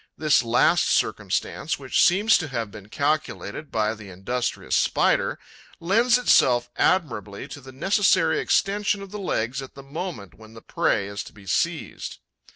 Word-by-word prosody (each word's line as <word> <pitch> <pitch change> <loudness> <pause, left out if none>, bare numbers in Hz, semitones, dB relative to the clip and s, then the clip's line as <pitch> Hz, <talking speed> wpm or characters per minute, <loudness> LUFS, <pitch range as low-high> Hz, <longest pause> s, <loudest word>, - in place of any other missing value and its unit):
This 155 -4 +3
last 120 0 +3
circumstance, 160 +2 -1
which 135 -2 +1
seems 205 +5 +4
to 160 - -4
have 115 -6 -4
been 105 -1 -12
calculated 150 -2 -2
by 110 0 0
the 105 -2 -11
industrious 110 +7 -3
Spider, - - +2 0.4
lends 230 +8 +3
itself 125 - +3
admirably 105 - 0
to 145 - -9
the 130 0 -12
necessary 190 - +2
extension 205 0 +1
of 195 - -11
the 210 - -6
legs 135 - -2
at 135 - -11
the 140 - -11
moment 145 - -6
when 110 0 -16
the 115 - -11
prey 100 - 0
is 100 0 -5
to - - -13
be 100 -2 -16
seized. 90 - -2
135 Hz, 160 wpm, -24 LUFS, 110-180 Hz, 0.4 s, seems